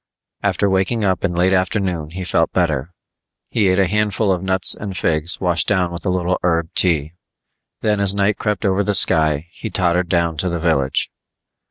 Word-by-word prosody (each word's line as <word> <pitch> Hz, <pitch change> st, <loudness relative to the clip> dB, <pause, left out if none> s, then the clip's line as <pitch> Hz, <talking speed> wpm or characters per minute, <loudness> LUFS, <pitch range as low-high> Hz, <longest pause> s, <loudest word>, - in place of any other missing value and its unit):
After 100 Hz, -, +1 dB
waking 95 Hz, +4 st, 0 dB
up 95 Hz, -2 st, 0 dB
in 90 Hz, -3 st, -1 dB
late 90 Hz, +2 st, +2 dB
afternoon 90 Hz, -4 st, -1 dB
he 95 Hz, +3 st, -6 dB
felt 90 Hz, -, 0 dB
better. 70 Hz, +7 st, 0 dB, 0.6 s
He 105 Hz, -4 st, +2 dB
ate 95 Hz, 0 st, +2 dB
a 95 Hz, -, +4 dB
handful 105 Hz, +1 st, 0 dB
of 90 Hz, -2 st, -1 dB
nuts 95 Hz, 0 st, +2 dB
and 100 Hz, -3 st, -6 dB
figs 80 Hz, +2 st, 0 dB
washed 85 Hz, -3 st, 0 dB
down 90 Hz, -4 st, +1 dB
with 85 Hz, -1 st, -6 dB
a -, -, +2 dB
little 90 Hz, 0 st, 0 dB
herb 85 Hz, -2 st, 0 dB
tea. 80 Hz, -4 st, +1 dB, 0.7 s
Then 105 Hz, -1 st, +1 dB
as 100 Hz, -1 st, +3 dB
night 100 Hz, +1 st, +1 dB
crept 105 Hz, 0 st, -2 dB
over 95 Hz, +1 st, +1 dB
the 105 Hz, 0 st, -1 dB
sky, 80 Hz, -3 st, +3 dB
he -, -, -7 dB
tottered 90 Hz, -1 st, 0 dB
down 85 Hz, -2 st, 0 dB
to 90 Hz, +4 st, -1 dB
the 85 Hz, -, -2 dB
village. 80 Hz, -5 st, 0 dB
90 Hz, 190 wpm, -19 LUFS, 85-100 Hz, 0.7 s, a